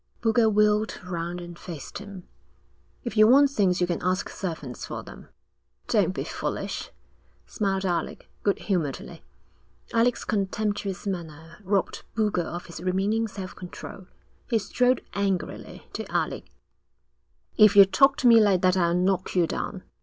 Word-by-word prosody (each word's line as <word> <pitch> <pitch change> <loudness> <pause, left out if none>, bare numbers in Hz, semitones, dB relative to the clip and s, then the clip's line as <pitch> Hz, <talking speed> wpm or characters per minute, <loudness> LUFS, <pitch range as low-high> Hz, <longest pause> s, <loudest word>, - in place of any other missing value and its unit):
Boulger 225 0 +3
wheeled 210 +1 +2
round 175 -1 -4
and 175 -1 -9
faced 165 -6 -8
him. 200 -3 -10 0.8
'If 240 -3 -5
you 215 0 +7
want 280 +3 +6
things 195 -8 +2
you 180 - +3
can 175 -1 -2
ask 185 +1 0
servants 160 -9 -6
for - - -5
them.' - - -12 0.6
'Don't - - +3
be - - -2
foolish,' - - -4 0.6
smiled 195 -2 -1
Alec, 175 -2 -2
good 200 - +1
humouredly. 170 -9 -3 0.7
Alec's 230 +1 +2
contemptuous 205 -1 -2
manner 165 -3 -6
robbed 195 0 -1
Boulger 210 -5 +1
of 175 +1 -6
his 170 -2 -9
remaining 195 +5 0
self 195 -3 -8
control. 185 +1 -9 0.4
He 230 - +3
strode 250 +4 +1
angrily 200 -2 -3
to - - -6
Alec. - - -1 1.1
'If 215 -2 +6
you 200 -1 +10
talk 275 +8 +4
to 255 - +2
me 230 -1 +8
like 195 -4 +3
that 185 0 +4
I'll 170 -2 +2
knock 185 +1 0
you 175 -2 +4
down.' 185 +3 -4
195 Hz, 145 wpm, -26 LUFS, 180-215 Hz, 1.1 s, you